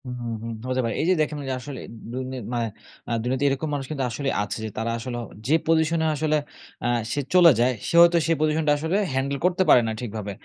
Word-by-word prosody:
হু, - - -7
হুম, 120 -1 -3
হুম 115 - -4 0.2
হতে 130 0 +1
পারে। 115 - -2
এই - - 0
যে - - +6
দেখেন 150 0 -1 0.2
আসলে। 135 +1 -7 0.3
দুনি 130 +1 -4 0.2
মানে, 120 -1 0 0.4
আ - - -3
দুনিয়াতে 130 +3 0
এরকম 135 +3 -2
মানুষ 140 -2 -2
কিন্তু 140 -3 -2
আসলেই 135 +4 -2
আছে 105 - -4
যে, - - -3
তারা 115 +1 -1
আসলে; 120 +1 -5 0.3
যে 145 - +3
পজিশন 160 0 +2
এ - - +1
আসলে 155 +1 +1 0.5
আ - - 0 0.3
সে 145 - -1
চলে 175 -2 +8
যায়, 125 +2 +4 0.2
সে - - -2
হয়তো 170 0 +6
সেই 165 - +3
পজিশনটা 155 0 +2
আসলে 160 +5 -1 0.2
হ্যান্ডেল 135 +1 -1
করতে 180 +1 +3
পারে 125 - +8
না - - -1
ঠিকভাবে। 110 -3 -5
135 Hz, 225 wpm, -24 LUFS, 120-155 Hz, 0.5 s, চলে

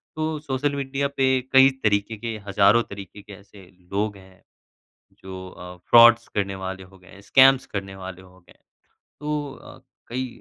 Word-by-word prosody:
तो 155 -1 -3
social 140 0 -2
media 140 0 -2
पे 135 -1 +3 0.2
कई 130 0 +8
तरीके 105 +1 0
के 115 0 -5
हज़ारों 100 +4 +4
तरीके 100 0 -10
के 100 - -13
ऐसे 100 -1 -16 0.3
लोग 105 0 -1
हैं। 95 -1 -19 0.8
जो 95 -1 -9
अ, 90 0 -11
फ़्रॉड्स 120 0 +7
करने 100 -1 -3
वाले 95 0 -6
हो 95 +1 -19
गए 90 - -20
हैं, 100 - -15
स्कैम्स 130 +6 +5
करने 95 -1 -6
वाले 95 -1 -9
हो 95 0 -19
गए। 90 - -23 0.6
तो 150 -1 -3
अ, - - -14 0.3
कई 130 +2 -3
105 Hz, 165 wpm, -23 LUFS, 95-130 Hz, 0.8 s, कई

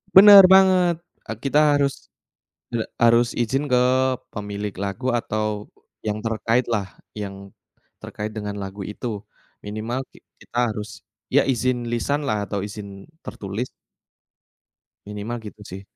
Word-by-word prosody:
Bener 200 0 +11
banget, 185 -2 +5 0.3
e - - -5
kita 140 +2 +3 0.2
harus, 140 -1 -1 0.6
e 120 - -2 0.2
harus 120 0 +4
izin 130 +5 0
ke 125 -3 +2 0.5
pemilik 105 -1 -5
lagu 100 +6 -2
atau 110 -3 -2 0.4
yang 105 0 -1
terkaitlah, 115 -1 0 0.3
yang, 100 -1 -7 0.5
terkait 105 +1 -6
dengan 105 -2 -5
lagu 95 +1 -7
itu. 105 +4 -7 0.6
Minimal 110 +5 -3
ki - - -18 0.2
kita - - -7
harus, 105 0 -7 0.3
ya - - +6
izin 125 -1 0
lisanlah 120 -4 -1
atau 100 +1 -3
izin 100 -1 -9 0.2
tertulis. 105 +5 -5 1.4
Minimal 105 +3 -5
gitu 105 0 -10
sih. 95 0 -8
110 Hz, 120 wpm, -23 LUFS, 105-130 Hz, 1.4 s, Bener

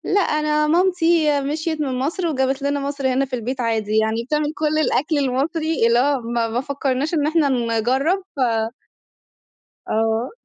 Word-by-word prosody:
لأ 405 - +4
أنا 300 -2 +1
مامتي 330 -3 +2
مشْيِت 310 +3 -2
من 260 -3 -2
مصر 340 +6 -1
وجابت 265 -2 0
لنا 285 +1 0
مصر 280 -2 -1
هنا 270 +2 +1
في 260 -1 -4
البيت 250 +2 -4
عادي. 220 -2 0
يعني 220 +1 +1
بتعمل 300 +4 -1
كل 310 0 0
الأكل 305 +1 +1
المصري، 285 +1 0
اللي 235 +1 +3
هو 275 0 +1
ما 230 0 -1
ما 230 +2 -2
فكّرناش 275 +2 -2
إن 300 -3 +1
إحنا 310 -3 +2
نجرّب 255 - 0
ف - - -8 1.5
آه. 225 +2 0
280 Hz, 160 wpm, -21 LUFS, 250-305 Hz, 1.5 s, لأ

